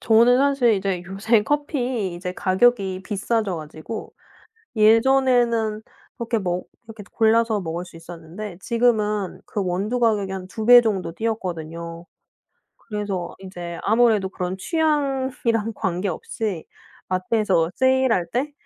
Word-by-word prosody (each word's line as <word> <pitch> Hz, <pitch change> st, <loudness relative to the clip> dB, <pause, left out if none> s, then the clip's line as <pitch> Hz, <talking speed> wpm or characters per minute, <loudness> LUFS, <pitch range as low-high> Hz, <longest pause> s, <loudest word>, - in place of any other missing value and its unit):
저는 235 Hz, +2 st, +5 dB
사실 275 Hz, -5 st, +3 dB
이제 190 Hz, -2 st, -2 dB
요새 210 Hz, +3 st, +2 dB
커피 250 Hz, -, -1 dB
이제 180 Hz, +1 st, -5 dB
가격이 190 Hz, -1 st, +1 dB
비싸져 210 Hz, -2 st, -1 dB
가지고 155 Hz, +8 st, -8 dB, 0.6 s
예전에는 230 Hz, -1 st, +3 dB, 0.4 s
이렇게 235 Hz, -1 st, -1 dB
먹 180 Hz, -2 st, -3 dB, 0.2 s
이렇게 220 Hz, -2 st, -10 dB
골라서 225 Hz, -1 st, +3 dB
먹을 170 Hz, +1 st, -4 dB
수 170 Hz, -2 st, -14 dB
있었는데 175 Hz, +3 st, -9 dB
지금은 215 Hz, -4 st, 0 dB
그 205 Hz, -, -3 dB
원두 200 Hz, +7 st, -1 dB
가격이 210 Hz, -5 st, +1 dB
한 185 Hz, -1 st, -5 dB
2 220 Hz, +2 st, -5 dB
배 245 Hz, 0 st, +10 dB
정도 195 Hz, -7 st, -2 dB
뛰었거든요. 170 Hz, -5 st, -4 dB, 0.7 s
그래서 205 Hz, -5 st, -5 dB
인제 175 Hz, -3 st, -7 dB
아무래도 220 Hz, -3 st, +3 dB
그런 185 Hz, 0 st, -4 dB
취향이랑 270 Hz, -, 0 dB
관계없이 200 Hz, -, -3 dB, 0.4 s
마트에서 185 Hz, -2 st, +1 dB
세일할 260 Hz, -9 st, +2 dB
때 275 Hz, +5 st, -1 dB
210 Hz, 280 characters per minute, -22 LUFS, 185-235 Hz, 0.7 s, 배